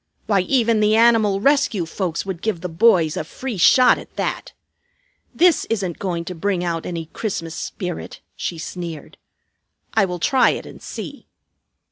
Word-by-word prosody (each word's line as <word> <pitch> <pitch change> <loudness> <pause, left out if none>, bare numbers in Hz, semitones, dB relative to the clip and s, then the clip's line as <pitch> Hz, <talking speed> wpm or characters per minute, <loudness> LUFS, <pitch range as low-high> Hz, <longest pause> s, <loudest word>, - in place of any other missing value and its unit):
Why, 205 -3 +2
even 230 +2 +2
the 215 0 +3
Animal 225 -3 +4
Rescue 275 - +2
folks 170 0 -3
would 190 -3 -5
give 215 -7 -2
the 180 - -3
boys 165 -3 +3
a - - -2
'free 240 +7 -6
shot' 255 +8 +6
at - - -14
that. - - -3 0.8
This 350 -1 +3
isn't 195 -7 -3
going 170 -3 -3
to 180 - -5
bring 180 +1 -1
out 170 -2 -2
any 170 -2 -4
Christmas 170 -7 -4
spirit," 180 -2 -6 0.2
she 170 - -4
sneered. 165 -1 -7 0.7
"I 220 -3 +4
will 180 -1 -4
try 255 +9 +3
it - - -9
and - - -12
see." - - -8
190 Hz, 160 wpm, -21 LUFS, 170-225 Hz, 0.8 s, shot